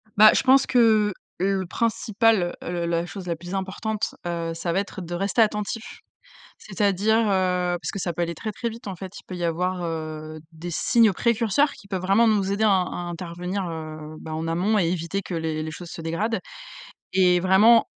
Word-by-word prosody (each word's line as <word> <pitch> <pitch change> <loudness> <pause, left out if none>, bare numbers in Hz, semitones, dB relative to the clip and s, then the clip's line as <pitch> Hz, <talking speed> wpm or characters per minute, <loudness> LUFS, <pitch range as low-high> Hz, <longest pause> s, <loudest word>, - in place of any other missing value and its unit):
Bah, 215 +1 +9
je - - +3
pense 265 +1 +5
que 220 -4 +4 0.3
le 190 0 +1
principal, 220 -2 +1
heu, - - -4
le 175 -1 -2
la 170 0 0
chose 180 +2 -8
la 170 - -1
plus 175 +3 -9
importante, 200 +3 -3
heu, 170 -1 -2
ça 165 +1 -3
va 190 - +2
être 200 -1 -5
de 175 0 -6
rester 195 +6 +1
attentif. 215 +1 -1 0.6
C'est-à-dire, 205 +2 +1
heu, 185 -4 +1
parce - - -3
que 200 - -4
ça 175 -2 -2
peut 175 - -2
aller 170 0 -2
très, 215 +7 -5
très 235 +3 -3
vite, 230 0 -10
en 190 - -5
fait. 185 +1 -8
Il - - -28
peut 185 - -6
y 175 - -3
avoir, 180 +2 -1
heu, 155 -1 -5
des 165 +2 -7
signes 225 +5 +3
précurseurs 235 +7 +2
qui - - -15
peuvent 190 -2 -2
vraiment 195 +5 +4
nous 200 -3 +2
aider 210 +2 +1
à - - +5
in 185 -2 +3 0.2
in - - -4
intervenir, 180 +3 -4
heu, 155 -1 -7
bah 160 - -8
heu, - - -2
en 160 +1 -3
amont 185 +6 +1
et 180 - +2
éviter 180 +2 -2
que 180 - -6
les 160 -1 -2
les 155 - -4
choses 170 +2 -9
se - - -7
dégradent. 165 +8 -1 0.7
Et 180 -1 +4
vraiment 200 +6 +6
185 Hz, 215 wpm, -24 LUFS, 170-210 Hz, 0.7 s, Bah